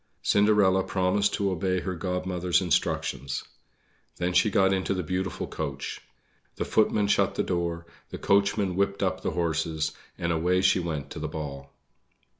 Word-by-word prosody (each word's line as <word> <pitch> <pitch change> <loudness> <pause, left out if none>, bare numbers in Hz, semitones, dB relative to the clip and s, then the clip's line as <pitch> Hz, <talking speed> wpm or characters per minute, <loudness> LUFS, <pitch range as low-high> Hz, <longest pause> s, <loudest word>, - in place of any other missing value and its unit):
Cinderella 100 -2 +4
promised 95 +3 +1
to 100 -1 0
obey 95 +1 0
her 95 - -3
Godmother's 90 0 0
instructions. 70 -5 -1 0.7
Then 90 +1 -1
she 90 +4 +4
got 95 -1 +3
into 95 0 0
the 90 - -2
beautiful 95 +2 -2
coach. 70 -4 -5 0.5
The - - -2
footman 105 -1 +2
shut 100 - +2
the - - +1
door, 85 -1 -2 0.2
the - - -6
coachman 100 -1 +2
whipped 100 +1 0
up 95 -1 -1
the - - -1
horses, 80 -2 0 0.3
and 85 0 -1
away 90 +3 +2
she 95 - +4
went 75 -5 -4
to - - -6
the 75 - -3
ball. 70 -3 -6
90 Hz, 155 wpm, -27 LUFS, 80-95 Hz, 0.7 s, Cinderella